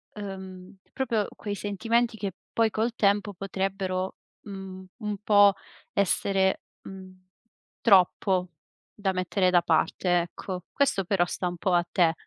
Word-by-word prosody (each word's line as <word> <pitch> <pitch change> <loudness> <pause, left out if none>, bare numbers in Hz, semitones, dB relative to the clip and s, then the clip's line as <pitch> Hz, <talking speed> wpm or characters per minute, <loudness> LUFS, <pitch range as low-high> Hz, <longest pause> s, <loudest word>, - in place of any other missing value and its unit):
uhm, 190 -2 -8 0.2
proprio 230 -6 0
quei 205 -1 -4
sentimenti 225 +4 0
che 200 -3 -4 0.2
poi 225 -1 +3
col 225 +3 0
tempo 205 -1 +2
potrebbero, 190 0 -3 0.3
mhmm, 190 -2 -8
un 210 -3 -4
po' 205 -2 +6 0.4
essere, 195 -1 +2 0.2
mhmm, 190 -1 -10 0.7
troppo 185 -2 +4 0.4
da 200 -2 -1
mettere 185 0 +1
da 175 -1 +4
parte, 175 +2 +2
ecco. 180 +1 -6
Questo 270 -8 +1
però 180 -1 +2
sta 180 +1 -3
un 175 0 -4
po' 180 +2 0
a 175 0 +3
te. 170 -3 +3
195 Hz, 130 wpm, -27 LUFS, 185-205 Hz, 0.7 s, po